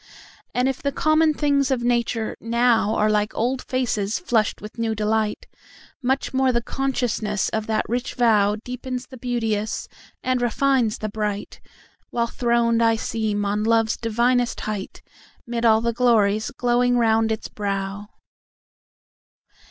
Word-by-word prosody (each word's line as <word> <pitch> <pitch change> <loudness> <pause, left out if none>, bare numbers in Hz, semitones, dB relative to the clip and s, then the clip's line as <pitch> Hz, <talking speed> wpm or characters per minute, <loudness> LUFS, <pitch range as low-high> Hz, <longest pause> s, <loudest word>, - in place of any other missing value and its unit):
And 250 +1 +2
if 270 -1 -2
the 280 - 0
common 310 +2 +3
things 285 -2 +2
of 255 -3 0
nature 235 -2 0
nowAre 230 -2 +2
like 210 0 0
old 250 +3 0
faces 225 -5 -1
flushed 230 - 0
with 210 +2 -10
new 225 -1 0
delight, 215 0 -1 0.6
Much 265 +2 -1
more 265 0 +3
the 235 - +1
consciousness 240 -7 -1
of 220 -1 -3
that 220 -1 0
rich 245 +3 -3
vowDeepens 245 +3 0
the 260 - -10
beauteous, 225 -3 -2 0.4
and 255 -1 0
refines 245 -1 +1
the 215 - -4
bright, 210 -1 -4 0.5
While 235 -1 0
throned 235 -1 +1
I 225 -1 +4
seem 215 -2 -2
on 205 +1 0
love's 225 0 +2
divinest 240 +2 +1
height'Mid 220 +3 -6
all 220 -1 +5
the 235 0 0
glories 220 -3 +2
glowing 245 0 +1
round 225 -1 +3
its 220 - -3
brow. 200 0 -4
230 Hz, 135 wpm, -23 LUFS, 215-250 Hz, 0.6 s, all